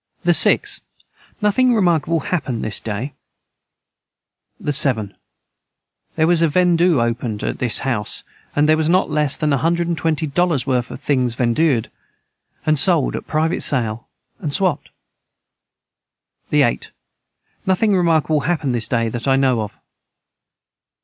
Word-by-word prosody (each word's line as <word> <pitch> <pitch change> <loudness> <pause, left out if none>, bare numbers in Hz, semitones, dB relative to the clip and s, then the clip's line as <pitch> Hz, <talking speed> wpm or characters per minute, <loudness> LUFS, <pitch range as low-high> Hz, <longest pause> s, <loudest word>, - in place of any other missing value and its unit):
the - - +3
6. - - +4 0.6
Nothing 245 +4 +3
remarkable 170 -5 +1
hapned 140 -10 -3
this 110 - -2
day. 115 +6 -5 1.5
the 145 - -2
7. 120 -8 +2 1.0
Their 160 - +2
was 170 0 +3
a 165 - +4
vendue 175 -1 +2
opened 115 -2 -2
att - - -3
this 120 -3 +3
house 110 -5 0 0.3
and 145 +1 +2
their 155 0 +4
was 160 0 0
not 180 -2 +2
Less 150 -2 0
than 150 -2 0
a 135 - +1
hundred 170 +3 0
and 170 - -1
twenty 160 -1 -1
Dollars 155 -3 0
worth 125 -2 -1
of - - -8
things 130 -5 -1
vendued 125 0 0 0.7
and 155 -2 +2
sold 165 -3 +3
at - - -7
private 155 +2 -1
sale 115 -4 0 0.3
and 150 - -4
Swapt. 180 -2 -1 1.6
the - - +3
8. - - -1 0.8
Nothing 195 +2 +2
remarkable 160 -3 +1
hapned 155 -6 -1
this 115 -2 -1
day 115 -2 0
that 120 +3 -5
I 135 - +4
know 130 -4 +1
of. 105 -1 -7
150 Hz, 145 wpm, -19 LUFS, 125-170 Hz, 1.6 s, 6